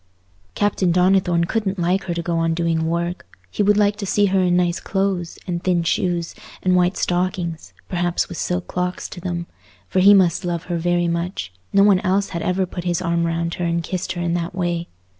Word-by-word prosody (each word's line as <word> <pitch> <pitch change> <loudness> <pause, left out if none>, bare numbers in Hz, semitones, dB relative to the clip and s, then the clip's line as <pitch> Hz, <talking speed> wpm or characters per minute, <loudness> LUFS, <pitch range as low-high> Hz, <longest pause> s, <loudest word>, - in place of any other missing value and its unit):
Captain 200 -3 +1
Donnithorne 180 -1 +3
couldn't 200 0 -1
like 180 +2 0
her 175 -2 -2
to 170 - -3
go 170 0 -1
on 165 0 +1
doing 165 -1 0
work: 170 - -3
he - - -1
would 205 0 +4
like 205 0 +3
to 205 - -4
see 205 +2 +3
her 190 -1 +2
in 180 -1 +3
nice 175 -1 +1
clothes, 190 -3 -2
and 175 -2 -3
thin 175 -2 +2
shoes, 170 0 0 0.3
and 185 -1 +3
white 180 +1 +2
stockings, 175 -2 -2 0.2
perhaps 175 -1 0
with 175 - -7
silk 180 0 -1
clocks 180 0 -3
to 175 - -9
them; 175 -1 -3 0.4
for 185 - 0
he 200 +2 +8
must 180 -3 +3
love 175 -1 -2
her 175 -1 -3
very 175 +1 +1
much—no 170 - -1
one 200 -2 +5
else 195 +1 +1
had 170 - -4
ever 185 +2 0
put 175 -1 -6
his 175 0 0
arm 170 -1 0
round 170 0 -1
her 180 - -3
and 170 0 0
kissed 185 +2 -3
her 175 - -4
in 170 -1 0
that 175 0 -2
way. 175 -2 -1
175 Hz, 210 wpm, -21 LUFS, 170-185 Hz, 0.4 s, he